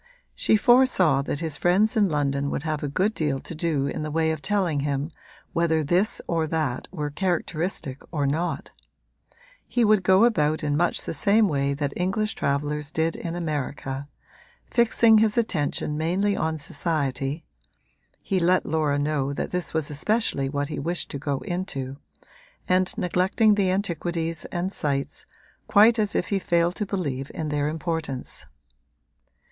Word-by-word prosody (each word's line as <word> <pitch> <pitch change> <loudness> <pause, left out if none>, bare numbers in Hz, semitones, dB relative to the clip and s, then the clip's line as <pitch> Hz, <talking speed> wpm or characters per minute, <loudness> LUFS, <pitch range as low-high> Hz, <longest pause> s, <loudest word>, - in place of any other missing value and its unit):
She 220 - +3
foresaw 210 - +4
that 140 +2 -3
his 160 -3 -2
friends 205 +7 +3
in 205 -3 +3
London 140 -2 0
would 140 - -3
have 155 -2 -2
a 145 - -2
good 190 +9 +1
deal 150 -7 -1
to - - -8
do 155 -4 0
in 140 - -3
the 155 - -3
way 160 +1 +1
of 160 -2 -4
telling 190 -7 0
him 140 +2 -2 0.4
whether 160 -2 +2
this 180 +8 +1
or 165 -2 0
that 155 -6 -2
were 150 -5 -4
characteristic 165 -4 -2
or 145 -4 0
not; 160 +6 -2 1.0
he 240 -2 +2
would 210 -2 +4
go 190 +4 +5
about 155 -9 +1
in 145 -1 0
much 170 +3 +1
the - - -3
same 210 +7 +3
way 140 -3 0
that 140 -1 -2
English 205 +4 0
travellers 145 +1 -2
did 160 +1 0
in 170 0 -5
America, 145 -4 -3 0.6
fixing 230 -2 +5
his 220 +1 +2
attention 150 -8 0
mainly 185 +6 +1
on 160 0 -1
society 145 -1 -2 0.8
(he 195 -2 0
let 180 +2 +3
Laura 150 -2 +1
know 145 -1 0
that - - -4
this 180 -2 -1
was 160 -2 -1
especially 150 -3 0
what 145 +1 -2
he 155 - -4
wished 170 +4 -1
to 140 - -4
go 140 -1 -2
into) 140 -8 -4 0.7
and 185 0 +1
neglecting 185 +5 +2
the 200 -2 +2
antiquities 170 -3 -1
and 180 +2 -3
sights, 140 -2 -2 0.4
quite 220 +3 +6
as 210 -2 +1
if - - 0
he 200 - +1
failed 170 -1 +1
to 210 +2 -4
believe 140 -9 -3
in 155 -2 -3
their 145 0 0
importance. 160 -4 -3
160 Hz, 160 wpm, -25 LUFS, 145-185 Hz, 1.0 s, quite